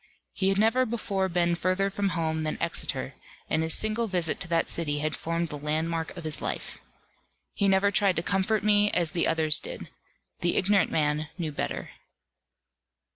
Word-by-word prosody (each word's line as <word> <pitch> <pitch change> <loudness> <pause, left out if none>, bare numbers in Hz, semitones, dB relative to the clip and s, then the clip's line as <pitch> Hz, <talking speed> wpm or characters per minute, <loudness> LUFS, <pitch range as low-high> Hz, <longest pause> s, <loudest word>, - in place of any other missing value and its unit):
He 190 -1 +1
had 195 - +1
never 225 +5 +3
before 200 -5 -1
been 170 0 +2
further 185 +3 0
from 200 0 0
home 160 -1 -1
than 155 0 -3
Exeter; - - -2 0.4
and 155 - +2
his 160 0 +3
single 220 +2 0
visit 175 -5 -1
to - - -1
that 165 -1 +1
city 150 -3 +1
had 155 +1 -1
formed 165 0 -2
the 150 - -2
landmark 160 +3 -2
of 170 - -7
his 155 -1 -3
life. - - -3 0.7
He 200 - +1
never 195 +1 +3
tried 200 -2 +3
to 165 - -1
comfort 200 +2 +1
me 210 0 +4
as 170 -3 +1
the 170 - +1
others 160 -2 +1
did. - - -8 0.5
The 175 - +1
ignorant 200 +1 +3
man 150 0 0
knew 165 -4 -3
better. 145 - -4
175 Hz, 180 wpm, -27 LUFS, 160-200 Hz, 0.7 s, me